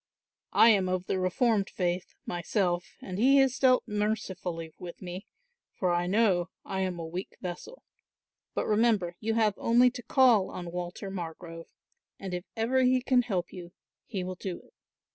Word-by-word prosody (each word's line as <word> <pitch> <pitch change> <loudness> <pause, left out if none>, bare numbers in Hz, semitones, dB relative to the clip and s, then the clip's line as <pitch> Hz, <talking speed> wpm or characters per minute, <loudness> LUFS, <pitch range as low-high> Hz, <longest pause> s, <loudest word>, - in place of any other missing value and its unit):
I 230 - +8
am 195 -4 +3
of 185 0 -1
the 190 - -1
reformed 200 +2 +1
faith 180 0 -2
myself 175 0 -1
and 185 0 -5
He 270 +4 +5
has 270 -1 +3
dealt 255 -2 +4
mercifully 190 -6 -3
with 175 -1 -8
me; 180 +1 -7 0.5
for 180 -2 +1
I 175 0 0
know 190 -3 +2 0.2
I 190 - -3
am 185 -2 -2
a 165 - -5
weak 175 +4 -6
vessel. 185 - -7 0.7
But - - 0
remember 210 -5 +2
you 225 +1 -1
have 215 -3 +3
only 245 +2 +4
to 245 - -7
call 240 -5 +4
on 175 -1 -7
Walter 180 +2 -5
Margrove 165 -2 -7 0.5
and 190 -2 -6
if 180 +1 -4
ever 245 +4 +2
he 255 0 +4
can 255 -1 +4
help 195 -8 -3
you 175 -2 -9 0.3
he 195 -6 -3
will 185 +1 -4
do 185 -1 -6
it." - - -25
190 Hz, 170 wpm, -29 LUFS, 175-225 Hz, 0.7 s, I